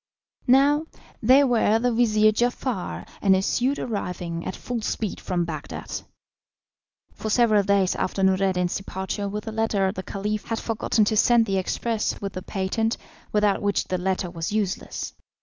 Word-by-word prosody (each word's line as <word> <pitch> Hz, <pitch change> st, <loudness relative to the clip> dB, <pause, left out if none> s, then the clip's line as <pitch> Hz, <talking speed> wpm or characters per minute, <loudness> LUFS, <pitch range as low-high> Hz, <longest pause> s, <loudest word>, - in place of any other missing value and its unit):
Now, 285 Hz, +5 st, +4 dB, 0.3 s
they 260 Hz, +5 st, +6 dB
were 230 Hz, -4 st, +3 dB
the 245 Hz, +2 st, +1 dB
vizir 215 Hz, -2 st, +4 dB
Giafar 215 Hz, -, -2 dB
and 195 Hz, -2 st, +5 dB
his 190 Hz, +1 st, +1 dB
suite 265 Hz, +4 st, +1 dB
arriving 180 Hz, -6 st, -4 dB
at -, -, -3 dB
full 245 Hz, -2 st, -4 dB
speed 215 Hz, -1 st, -3 dB
from 175 Hz, -2 st, -1 dB
Bagdad. 155 Hz, -3 st, -6 dB, 1.1 s
For 220 Hz, -, -5 dB
several 215 Hz, -2 st, +4 dB
days 200 Hz, -2 st, +2 dB
after 195 Hz, +1 st, -1 dB
Noureddin's 185 Hz, -2 st, +2 dB
departure 195 Hz, +1 st, -4 dB
with 210 Hz, +1 st, -4 dB
the 220 Hz, -, -5 dB
letter 215 Hz, -3 st, +1 dB
the 190 Hz, -, -5 dB
Caliph 205 Hz, +3 st, -3 dB
had 225 Hz, -, -2 dB
forgotten 220 Hz, -1 st, +1 dB
to 215 Hz, -, +1 dB
send 235 Hz, +1 st, +5 dB
the 195 Hz, -2 st, 0 dB
express 220 Hz, +4 st, -1 dB
with 195 Hz, -1 st, -5 dB
the 185 Hz, -, -5 dB
patent, 195 Hz, +4 st, -1 dB, 0.3 s
without 210 Hz, -1 st, +2 dB
which 205 Hz, 0 st, 0 dB
the 185 Hz, -, 0 dB
letter 185 Hz, -1 st, -1 dB
was 165 Hz, +1 st, -4 dB
useless. 205 Hz, -3 st, -2 dB
205 Hz, 160 wpm, -24 LUFS, 190-225 Hz, 1.1 s, they